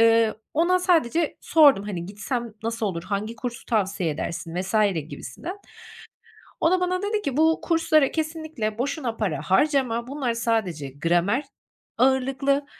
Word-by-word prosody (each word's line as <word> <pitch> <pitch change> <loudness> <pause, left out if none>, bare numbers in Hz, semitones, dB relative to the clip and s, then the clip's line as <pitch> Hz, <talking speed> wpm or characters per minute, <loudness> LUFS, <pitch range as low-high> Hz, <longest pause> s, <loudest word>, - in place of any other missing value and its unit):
eee, 225 -1 +5 0.2
ona 345 +4 +3
sadece 335 -3 +2
sordum, 290 -10 +5
hani, 180 -4 -4
gitsem 225 +3 -4
nasıl 230 -1 -2
olur, 170 -4 -3
hangi 210 +3 -3
kursu 240 +1 -6
tavsiye 190 -6 0
edersin 165 +2 -4
vs. 190 +3 -5 0.3
gibisinden. 360 - -7 1.0
O 325 - +3
da 370 - +3
bana 365 0 0
dedi 420 +1 -1
ki: 280 -7 -3
"Bu 320 +1 +4
kurslara 325 -4 +3
kesinlikle 315 -9 -3
boşuna 255 -2 -2
para 170 -10 -1
harcama, 235 - +1
bunlar 265 -3 -2
sadece 215 -11 -1
gramer 175 - +1 0.5
ağırlıklı, 270 +2 +2
240 Hz, 135 wpm, -24 LUFS, 205-310 Hz, 1.0 s, eee